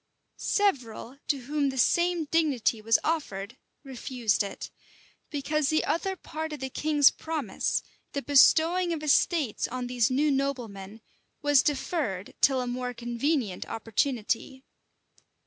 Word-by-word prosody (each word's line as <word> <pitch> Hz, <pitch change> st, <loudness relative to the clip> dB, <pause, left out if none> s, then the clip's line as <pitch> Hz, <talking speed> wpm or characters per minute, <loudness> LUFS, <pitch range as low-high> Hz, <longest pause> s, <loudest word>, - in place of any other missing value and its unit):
594 -, -, -3 dB
Several, 265 Hz, -, -1 dB
to 285 Hz, -, +1 dB
whom 285 Hz, +2 st, 0 dB
the 265 Hz, -, -5 dB
same 345 Hz, +6 st, +2 dB
dignity 280 Hz, -9 st, +1 dB
was 225 Hz, +1 st, +4 dB
offered, 235 Hz, -9 st, -2 dB, 0.3 s
refused 250 Hz, -5 st, -1 dB
it; 200 Hz, -1 st, -5 dB, 0.6 s
because 295 Hz, 0 st, -1 dB
the 310 Hz, -1 st, +1 dB
other 380 Hz, +3 st, -1 dB
part 315 Hz, -2 st, -6 dB
of 300 Hz, -, -6 dB
the 265 Hz, 0 st, -5 dB
king's 295 Hz, -1 st, +4 dB
promise, 320 Hz, -2 st, -2 dB, 0.3 s
the 280 Hz, -, -3 dB
bestowing 335 Hz, +5 st, +4 dB
of 310 Hz, -2 st, -5 dB
estates 300 Hz, -, +2 dB
on 255 Hz, 0 st, -4 dB
these 245 Hz, -3 st, +1 dB
new 285 Hz, +3 st, +2 dB
noblemen, 230 Hz, -7 st, -3 dB, 0.4 s
was 290 Hz, -2 st, +5 dB
deferred 265 Hz, -, -2 dB
till 265 Hz, -2 st, +4 dB
a -, -, -3 dB
more 250 Hz, 0 st, -4 dB
convenient 240 Hz, -, -1 dB
opportunity. 230 Hz, +3 st, -2 dB
270 Hz, 130 wpm, -27 LUFS, 235-305 Hz, 0.6 s, was